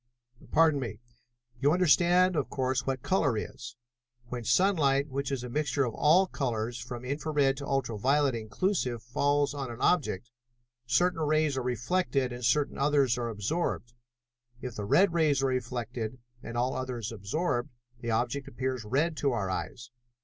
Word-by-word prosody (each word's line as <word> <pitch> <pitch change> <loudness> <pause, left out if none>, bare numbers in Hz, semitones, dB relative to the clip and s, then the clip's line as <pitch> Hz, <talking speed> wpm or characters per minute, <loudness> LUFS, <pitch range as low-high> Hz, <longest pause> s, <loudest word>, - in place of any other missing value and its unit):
"Pardon 160 -2 +4
me. 115 -5 -5 0.6
You 140 +2 +3
understand, 180 +1 +4
of 145 - -1
course, 130 -1 -1
what 130 -2 -2
color 145 - +1
is? 120 +1 -6 0.5
When 120 -1 -4
sunlight, 140 - +3
which 140 +1 -3
is 130 -3 -2
a - - -4
mixture 145 +1 0
of 120 - -3
all 165 - +4
colors 120 -7 -3
from 125 0 -7
infra 145 +4 -3
red 140 -2 +3
to 140 0 -6
ultra 125 -6 -1
violet 140 +3 +3
inclusive, 120 - -1
falls 145 +4 +1
on 135 -3 -4
an 120 0 -8
object, 120 - +1 0.6
certain 165 +9 +2
rays 155 -1 +2
are 130 - -1
reflected 125 +2 0
and 120 0 -7
certain 140 +4 +1
others 140 -3 +3
are 120 -1 -2
absorbed. 120 - -2 0.7
If 125 -1 -6
the 105 -2 -5
red 175 - +4
rays 150 -5 +2
are - - +3
reflected 120 -2 -3 0.2
and 115 - -6
all 125 +2 +1
others 125 -3 -4
absorbed, 120 - -2 0.3
the 120 - -5
object 120 +5 -1
appears 130 -2 -3
red 145 +10 0
to 140 -3 +1
our 100 -5 -1
eyes. 125 +5 -5
130 Hz, 165 wpm, -29 LUFS, 120-150 Hz, 0.7 s, Pardon